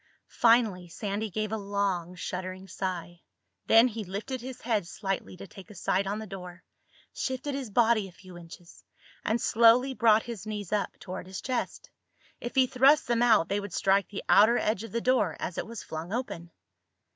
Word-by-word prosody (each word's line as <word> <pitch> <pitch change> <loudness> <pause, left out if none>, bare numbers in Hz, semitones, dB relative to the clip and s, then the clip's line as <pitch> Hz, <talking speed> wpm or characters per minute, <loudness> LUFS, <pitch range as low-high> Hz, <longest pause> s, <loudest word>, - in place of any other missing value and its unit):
Finally 225 -7 +4
Sandy 205 +4 -4
gave 215 +2 -3
a 220 - -1
long, 200 -4 -2
shuddering 185 +1 -5
sigh. 175 -2 -5 0.5
Then 225 +2 +7
he 225 -2 -5
lifted 210 +7 -5
his 255 +1 -8
head 220 -7 0
slightly 195 0 -4
to - - -9
take 195 +1 -13
a 210 - -12
sight 190 +2 0
on 205 +2 -2
the 220 - -6
door, 180 -2 -9 0.5
shifted 260 +2 -3
his 270 -4 -4
body 225 -1 +3
a - - -13
few 185 +1 -14
inches, 170 0 -13 0.4
and 225 +2 0
slowly 235 +4 +4
brought 225 -3 +4
his 225 -4 -7
knees 205 -4 -5
up 205 -1 -1
toward 185 -1 -7
his 190 0 -6
chest. 255 -2 -4 0.5
If 240 - -6
he 260 -1 +5
thrust 265 +4 +4
them 240 -1 +1
out 220 -8 +5
they 200 +2 0
would 200 -3 -7
strike 195 0 +2
the 205 - -6
outer 220 +4 +6
edge 215 -1 0
of 225 - -8
the 235 - -2
door 225 -11 +1
as 170 - -4
it - - -4
was 230 -1 -7
flung 160 +3 -6
open. 210 -8 -4
205 Hz, 190 wpm, -28 LUFS, 185-235 Hz, 0.5 s, Then